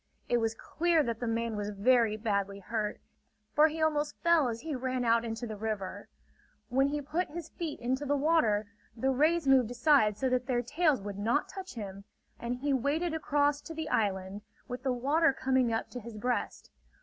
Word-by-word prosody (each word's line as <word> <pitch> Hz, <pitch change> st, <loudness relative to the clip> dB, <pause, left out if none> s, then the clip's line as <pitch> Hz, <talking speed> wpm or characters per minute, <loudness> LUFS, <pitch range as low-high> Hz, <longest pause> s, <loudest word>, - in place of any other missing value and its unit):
It 240 Hz, -, +2 dB
was 225 Hz, -1 st, 0 dB
clear 335 Hz, +5 st, +1 dB
that 230 Hz, -3 st, -3 dB
the 240 Hz, -, -3 dB
man 230 Hz, 0 st, -1 dB
was 205 Hz, 0 st, -3 dB
very 215 Hz, +1 st, +3 dB
badly 200 Hz, -2 st, -1 dB
hurt; 210 Hz, +1 st, -3 dB, 0.5 s
for 300 Hz, +1 st, +6 dB
he 315 Hz, 0 st, -2 dB
almost 300 Hz, -1 st, 0 dB
fell 335 Hz, -5 st, +4 dB
as 230 Hz, -1 st, -4 dB
he 315 Hz, -1 st, -4 dB
ran 255 Hz, -1 st, -2 dB
out 230 Hz, 0 st, +3 dB
into 230 Hz, +1 st, -4 dB
the 220 Hz, -2 st, -5 dB
river. 210 Hz, -3 st, -4 dB, 0.6 s
When 270 Hz, +2 st, +3 dB
he 295 Hz, +1 st, -2 dB
put 330 Hz, +6 st, -1 dB
his 330 Hz, +1 st, -7 dB
feet 330 Hz, -3 st, -5 dB
into 260 Hz, +4 st, -1 dB
the 285 Hz, -, +2 dB
water, 270 Hz, -9 st, +2 dB, 0.3 s
the 265 Hz, +4 st, +1 dB
rays 310 Hz, +3 st, +2 dB
moved 260 Hz, -4 st, +5 dB
aside 245 Hz, -4 st, +3 dB
so 260 Hz, -, 0 dB
that 250 Hz, 0 st, 0 dB
their 245 Hz, -2 st, +1 dB
tails 295 Hz, -, +1 dB
would 200 Hz, -1 st, -6 dB
not 235 Hz, +8 st, +1 dB
touch 380 Hz, -4 st, -8 dB
him; 200 Hz, -3 st, -7 dB, 0.4 s
and 235 Hz, +1 st, -2 dB
he 280 Hz, +3 st, -1 dB
waded 300 Hz, +6 st, 0 dB
across 290 Hz, -2 st, +1 dB
to 325 Hz, -, -9 dB
the 315 Hz, -1 st, -4 dB
island, 195 Hz, -3 st, -1 dB, 0.3 s
with 250 Hz, 0 st, -5 dB
the 265 Hz, -1 st, 0 dB
water 280 Hz, +5 st, +2 dB
coming 260 Hz, -2 st, +1 dB
up 225 Hz, 0 st, -2 dB
to 250 Hz, -, -5 dB
his 230 Hz, -1 st, -9 dB
breast. 245 Hz, +3 st, -2 dB
250 Hz, 195 wpm, -30 LUFS, 225-295 Hz, 0.6 s, for